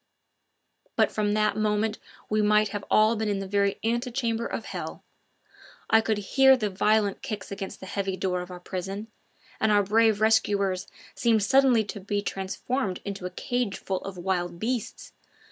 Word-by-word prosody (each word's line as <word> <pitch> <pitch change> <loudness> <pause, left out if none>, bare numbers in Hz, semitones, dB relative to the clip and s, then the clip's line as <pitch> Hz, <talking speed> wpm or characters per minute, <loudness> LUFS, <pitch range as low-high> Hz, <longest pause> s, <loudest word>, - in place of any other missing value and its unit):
But - - +3
from 210 -1 0
that 215 0 +2
moment 215 0 0 0.3
we 215 0 +1
might 210 0 +3
have 205 -1 -5
all 215 +2 +4
been 220 -1 -1
in 200 - 0
the 195 - -4
very 200 0 +1
ante 240 +3 0
chamber 235 -2 -1
of - - -5
hell. - - -6 0.9
I 225 - +6
could 220 -1 0
hear 265 +6 +5
the 210 -4 -2
violent 210 +1 +2
kicks 215 -7 -6
against 195 -1 -6
the - - -9
heavy 195 0 -3
door 180 -1 -1
of 180 - -8
our 180 -1 -8
prison, 195 +4 -5 0.5
and 220 - +2
our 205 -1 +4
brave 220 +1 +3
rescuers 200 -3 +2 0.3
seemed 225 -3 +2
suddenly 255 0 +4
to 205 0 -7
be 205 +1 -2
transformed 195 +2 -3
into 195 -2 -4
a - - -6
cageful 195 -2 -2
of 195 -1 -7
wild 175 -1 -2
beasts. 230 +4 -4
210 Hz, 170 wpm, -26 LUFS, 195-220 Hz, 0.9 s, I